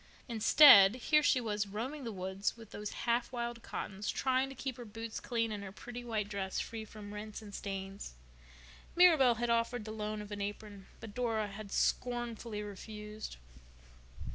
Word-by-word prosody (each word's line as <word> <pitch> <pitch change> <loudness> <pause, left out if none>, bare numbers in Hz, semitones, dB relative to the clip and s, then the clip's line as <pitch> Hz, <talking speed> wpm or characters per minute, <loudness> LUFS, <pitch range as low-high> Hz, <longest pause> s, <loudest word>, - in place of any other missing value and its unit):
Instead, 225 -3 +8
here 300 +4 +3
she 290 -3 +4
was 210 -3 -1
roaming 250 +8 -5
the 230 - -3
woods 190 +2 -3
with 225 -2 -13
those 210 0 -5 0.2
half 235 +1 +1
wild 235 -1 -4
Cottons, 205 -1 -5
trying 260 0 +1
to 270 - -9
keep 260 -2 -4
her 245 - -7
boots 225 0 -6
clean 230 -2 -1
and 205 -1 -4
her 190 - -7
pretty 245 +4 -8
white 220 -4 -2
dress 195 -2 -3
free 225 -1 -4
from 210 -1 -10
rents 210 0 -6
and 205 -1 -11
stains. 195 - -5 0.8
Mirabel 315 -9 +6
had 240 +1 -1
offered 230 -1 0
the 215 - -6
loan 215 0 -3
of 210 0 -8
an 205 -1 -4
apron 205 -1 -6
but 220 -2 -9
Dora 225 -3 -1
had 200 0 -9
scornfully 235 -3 -1
refused. 210 - -8
220 Hz, 170 wpm, -33 LUFS, 205-240 Hz, 0.8 s, Instead